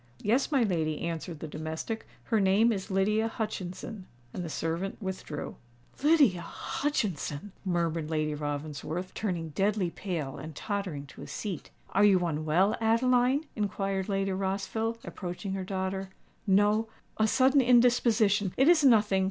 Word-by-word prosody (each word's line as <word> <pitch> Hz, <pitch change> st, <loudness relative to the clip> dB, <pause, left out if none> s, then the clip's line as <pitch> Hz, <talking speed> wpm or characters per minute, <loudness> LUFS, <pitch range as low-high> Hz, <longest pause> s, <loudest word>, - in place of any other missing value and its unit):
"Yes, 245 Hz, +8 st, +2 dB
my 270 Hz, -4 st, +4 dB
lady," 160 Hz, -7 st, 0 dB
answered 165 Hz, -1 st, -4 dB
the 160 Hz, -, -4 dB
domestic: 160 Hz, +8 st, -5 dB, 0.2 s
"her 225 Hz, -, +1 dB
name 200 Hz, +4 st, +4 dB
is 195 Hz, -1 st, -3 dB
Lydia 210 Hz, +3 st, +2 dB
Hutchinson." 210 Hz, -2 st, -5 dB, 0.3 s
And 180 Hz, -, -4 dB
the 165 Hz, -, -5 dB
servant 165 Hz, +5 st, -3 dB
withdrew. 190 Hz, -7 st, -5 dB, 0.4 s
"Lydia 285 Hz, -, +4 dB
Hutchinson!" 205 Hz, -, -3 dB
murmured 170 Hz, -4 st, -1 dB
Lady 155 Hz, -1 st, 0 dB
Ravensworth, 150 Hz, +4 st, -4 dB
turning 175 Hz, -6 st, -2 dB
deadly 195 Hz, +2 st, 0 dB
pale, 165 Hz, -10 st, -4 dB
and 155 Hz, -1 st, -8 dB
tottering 190 Hz, -9 st, -3 dB
to 135 Hz, -, -13 dB
a -, -, -8 dB
seat. 195 Hz, -8 st, -5 dB, 0.2 s
"Are 200 Hz, -, +3 dB
you 190 Hz, -4 st, +5 dB
unwell, 160 Hz, +5 st, +2 dB
Adeline?" 250 Hz, +5 st, +3 dB
inquired 195 Hz, -2 st, -2 dB
Lady 195 Hz, 0 st, 0 dB
Rossville, 195 Hz, +4 st, -2 dB
approaching 185 Hz, +1 st, -5 dB
her 195 Hz, -1 st, -3 dB
daughter. 190 Hz, 0 st, -3 dB, 0.4 s
"No—a 215 Hz, +2 st, +1 dB
sudden 265 Hz, +4 st, +4 dB
indisposition—it 235 Hz, -2 st, +4 dB
is 335 Hz, -3 st, +6 dB
nothing!" 215 Hz, -7 st, +5 dB
195 Hz, 135 wpm, -29 LUFS, 170-220 Hz, 0.4 s, is